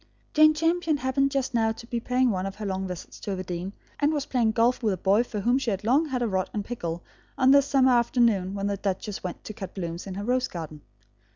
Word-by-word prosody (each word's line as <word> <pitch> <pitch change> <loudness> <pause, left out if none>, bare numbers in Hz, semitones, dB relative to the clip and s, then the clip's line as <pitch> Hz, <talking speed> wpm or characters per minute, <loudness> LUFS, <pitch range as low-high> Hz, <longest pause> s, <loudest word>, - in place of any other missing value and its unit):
Jane 310 0 +6
Champion 330 0 +1
happened 275 +1 +1
just 270 -2 -2
now 225 -1 +2
to 235 - -11
be 235 0 -3
paying 250 +1 +1
one 190 -1 -2
of 195 - -6
her 215 - -6
long 190 -1 -2
visits 180 -2 -8
to 200 - -4
Overdene, 180 0 -4 0.3
and 290 +1 +3
was 290 -3 -1
playing 230 -4 +1
golf 235 +3 +2
with 215 -5 +1
a - - -12
boy 195 +5 +3
for 215 -4 -5
whom 245 +6 +2
she 255 - -2
had 195 -1 -2
long 275 +9 +3
had 255 -4 -1
a - - +1
rod 190 -3 -1
in 205 - -1
pickle 175 -8 -5 0.3
on 260 0 +5
this 280 0 +5
summer 265 -2 +4
afternoon 235 -6 +2
when 200 0 -2
the 200 0 -1
duchess 195 +1 -3
went 180 -2 -6
to 215 - -7
cut 190 -2 -8
blooms 170 -1 -5
in 190 - -5
her 200 - -4
rose 250 +3 +1
garden. 155 -3 -7
225 Hz, 250 wpm, -26 LUFS, 190-260 Hz, 0.3 s, Jane